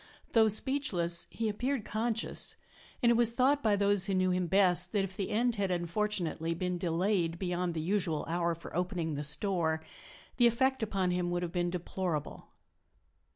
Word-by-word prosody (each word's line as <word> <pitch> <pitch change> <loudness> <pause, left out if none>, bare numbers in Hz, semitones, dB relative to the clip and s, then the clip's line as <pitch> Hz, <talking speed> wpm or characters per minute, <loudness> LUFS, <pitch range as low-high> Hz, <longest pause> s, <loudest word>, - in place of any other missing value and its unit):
Though 225 -1 +5
speechless, 210 - 0
he 225 - -3
appeared 245 +3 -2
conscious, 225 +1 -2 0.5
and 235 - +5
it - - +5
was 235 0 +3
thought 270 +4 +3
by 215 -2 +3
those 200 -1 +3
who 195 - 0
knew 185 0 +2
him 180 -1 0
best 180 -1 +3
that 205 -2 +2
if 190 -1 -6
the 195 - -3
end 235 +2 +1
had 195 -1 0
unfortunately 175 -2 -1
been 180 +1 -2
delayed 170 0 0
beyond 180 -1 -2
the 160 - -2
usual 170 -3 -1
hour 170 0 0
for 165 - -11
opening 175 -3 -2
the 145 +1 -3
store 160 +1 +2 0.5
the 240 - +6
effect 260 +3 +1
upon 195 -4 0
him 180 0 -1
would 175 0 -1
have 170 - -4
been 175 -1 -1
deplorable. 175 -3 -4
185 Hz, 175 wpm, -31 LUFS, 170-215 Hz, 0.5 s, the